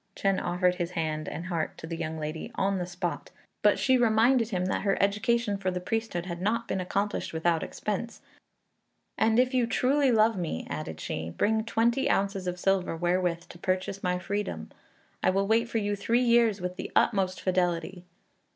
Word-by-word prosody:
Chên 195 -1 +1
offered 180 +1 +1
his 175 0 -3
hand 155 -1 -2
and 170 - -6
heart 170 -4 -2
to - - -8
the 165 +1 -4
young 160 0 -4
lady 155 +1 -5
on 195 0 +1
the 175 - -3
spot; 180 0 -4 0.3
but - - +4
she 260 -1 +3
reminded 230 +1 +4
him 180 -4 -1
that 185 - -1
her 195 -2 +1
education 210 +1 +1
for 190 -1 0
the 180 0 -2
priesthood 200 -2 -2
had 175 -1 -5
not 230 +4 0
been 190 - -1
accomplished 200 +2 -2
without 165 0 +1
expense, 215 +3 -4 1.0
"and 225 0 +2
if 255 +1 +3
you 250 -2 +2
truly 265 +4 +2
love 225 0 +4
me," 165 - -3
added - - -5
she, 80 +1 -4
"bring 220 - +1
twenty 235 +3 +1
ounces 195 -1 0
of 180 0 -3
silver 195 -2 +1
wherewith 175 0 0
to 170 - -12
purchase 185 +2 -2
my 180 -1 0
freedom. 200 +3 -4 0.5
I - - +3
will 195 +1 +1
wait 230 +3 +2
for 230 - -1
you 205 -1 0
three 230 +5 +1
years 235 -3 +4
with 180 0 -4
the - - -5
utmost 190 -2 +2
fidelity." 180 -1 -1
195 Hz, 190 wpm, -28 LUFS, 180-225 Hz, 1.0 s, but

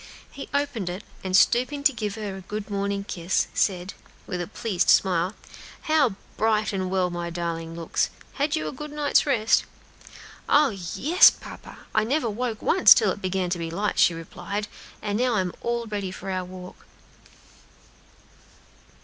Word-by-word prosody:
He 280 - -9
opened 280 -10 -1
it, 180 +3 -6 0.2
and 185 0 +3
stooping 255 +6 +2
to 285 -1 +5
give 210 -3 -3
her 210 -3 -5
a 190 - -8
good 210 +2 -6
morning 200 0 -1
kiss, 180 -2 -1
said, 185 -1 0 0.3
with 180 -3 -4
a 175 - -4
pleased 205 -4 -1
smile, 185 +1 +3 0.5
"How 300 - +2 0.2
bright 215 -1 +1
and 185 -1 -2
well 185 -1 0
my 175 0 -4
darling 165 -1 -4
looks! 170 -1 -1 0.2
Had 290 +3 0
you 310 - -2
a - - -3
good 300 +2 -8
night's 295 0 +2
rest?" 230 -5 +3 0.9
"Oh, 295 -1 +5
yes, 200 - +5
papa! - - -11 0.2
I - - +3
never 245 0 0
waked 225 0 -3
once 365 - +7
till 215 -4 +2
it 200 - -6
began 185 -1 -1
to 175 - -1
be 165 -1 -3
light," 200 +6 -2
she 170 - +5
replied; 200 +5 -5 0.4
"and 205 +1 -1
now 250 -2 +2
I'm 185 -3 0
all 235 0 -2
ready 205 -3 -4
for 190 +1 -6
our 185 -1 -2
walk." 180 0 -11
200 Hz, 165 wpm, -25 LUFS, 180-235 Hz, 0.9 s, once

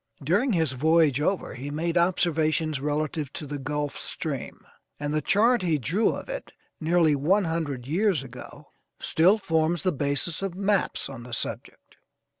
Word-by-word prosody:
During 205 - +2
his 160 -6 +1
voyage 150 +1 +3
over 190 +5 -1
he 135 +3 -6
made 165 +3 -2
observations 160 -4 +1
relative 150 -1 -2
to 155 - -6
the 145 0 -5
Gulf 145 +1 -3
Stream, - - -5 0.3
and 145 0 -2
the 155 - +1
chart 225 - +3
he 165 -4 +1
drew 165 - +1
of - - -4
it - - -6 0.3
nearly 160 -2 +3
one 180 +9 +2
hundred 160 -7 -2
years 175 +1 +1
ago, 135 +3 -11 0.3
still 180 +7 +4
forms 165 -3 0
the 185 - +2
basis 145 +3 -1
of 195 -3 -3
maps 200 0 0
on 135 -3 -8
the 120 0 -9
subject. - - -4
160 Hz, 160 wpm, -26 LUFS, 145-180 Hz, 0.3 s, still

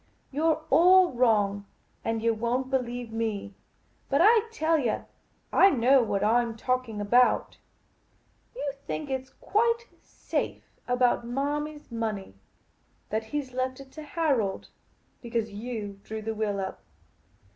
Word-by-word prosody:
" - - -41
You 295 +4 -1
're 315 -1 +2
all 360 +5 +6
wrong, 205 -5 +2 0.4
and 225 0 -2
yah 230 - +4
won't 245 +4 -1
believe 245 -2 -2
me. 220 -3 -3 0.6
But 280 - +2
I 450 +2 +5
tell 325 -6 +1
yah, 240 -6 -1 0.5
I 390 - +7
know 260 -2 +4
what 200 -4 -1
I 230 +3 +4
'm 230 -1 -5
talking 250 -3 -1
about. 240 +5 +3 1.0
You 290 - -2 0.2
think 290 -3 -4
it 260 0 -2
's - - -23
quite 465 +2 0 0.2
safe - - -4 0.2
about 250 -1 +2
Marmy's 295 +3 -3
money 220 - -3 0.4
— 85 +2 -40
that 220 +1 -1
he 295 +6 -2
's 255 -2 -16
left 255 +1 -2
it 270 -1 -12
to 310 - -9
Harold 285 - -1 0.3
— - - -40
because 230 -2 -2
you 210 -2 -5
drew 220 0 -6
the 225 +1 -2
will 210 -2 -1
up. 190 0 -5
245 Hz, 155 wpm, -27 LUFS, 220-285 Hz, 1.0 s, I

